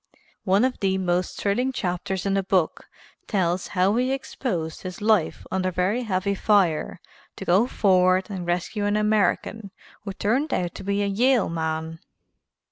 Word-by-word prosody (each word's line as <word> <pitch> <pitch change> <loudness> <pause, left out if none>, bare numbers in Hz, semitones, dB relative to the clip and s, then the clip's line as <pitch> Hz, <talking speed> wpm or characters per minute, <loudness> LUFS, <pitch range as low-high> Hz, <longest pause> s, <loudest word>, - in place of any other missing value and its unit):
One 195 +5 +4
of 260 - -2
the 190 -1 +1
most 180 -1 -1
thrilling 245 +6 0
chapters 185 -3 -3
in 195 - +1
the 195 - +2
book 185 -3 0 0.4
tells 180 -3 0
how 190 +3 +3
he 255 +2 +1
exposed 235 - -3
his 185 -1 -7
life 210 -5 +1
under 185 -1 0
very 185 +7 0
heavy 200 -3 -1
fire 195 -6 +1 0.4
to - - -7
go 195 +7 +4
forward 185 -4 +3
and 190 -4 -5
rescue 180 +4 -1
an 205 +1 +1
American 210 0 0 0.3
who 200 -2 -5
turned 255 +10 0
out 175 -2 -2
to - - -9
be 200 +1 0
a - - +1
Yale 235 +4 +2
man. 160 0 -3
195 Hz, 160 wpm, -24 LUFS, 180-210 Hz, 0.4 s, One